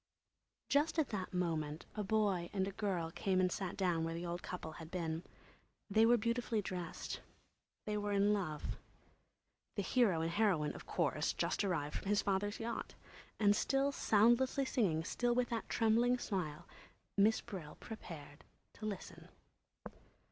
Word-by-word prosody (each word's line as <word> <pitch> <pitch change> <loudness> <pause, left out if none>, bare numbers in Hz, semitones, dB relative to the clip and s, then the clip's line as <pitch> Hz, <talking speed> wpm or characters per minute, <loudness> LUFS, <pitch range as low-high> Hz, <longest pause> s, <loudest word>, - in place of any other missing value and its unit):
Just 300 +3 +2
at 310 -4 +2
that 190 -4 -3
moment 160 -4 -1
a 210 - -2
boy 200 -4 +1
and 195 -1 -1
girl 185 -6 -1
came 185 +2 +1
and 185 -1 +3
sat 190 -2 -3
down 175 -4 +1
where 165 0 -2
the 170 +1 -4
old 175 +1 -3
couple 175 -3 -5
had 160 - -8
been. 165 -2 -2 0.7
They 220 +2 +6
were 240 +1 +6
beautifully 235 0 0
dressed; 180 -4 -4 0.6
they 210 -1 -1
were 205 0 -2
in 200 +1 +4
love. 165 -7 -2 1.0
The 200 - 0
hero 200 -8 +3
and 165 +1 0
heroine, 180 -6 +2
of - - -10
course, - - +1
just - - 0
arrived 160 -7 -1
from - - -9
his 205 0 +3
father's 205 +1 0
yacht. 230 0 -4 0.4
And 205 -1 +5
still 275 +5 +2
soundlessly 240 +3 +4
singing, 180 -12 +1
still 240 +7 0
with 250 -1 +2
that 230 -2 -3
trembling 235 +2 +3
smile, 175 -8 -3 0.5
Miss 210 +2 +5
Brill 160 -7 -7
prepared 160 -9 -9 0.3
to 215 - -5
listen. 200 -3 -7
200 Hz, 155 wpm, -36 LUFS, 170-225 Hz, 1.0 s, They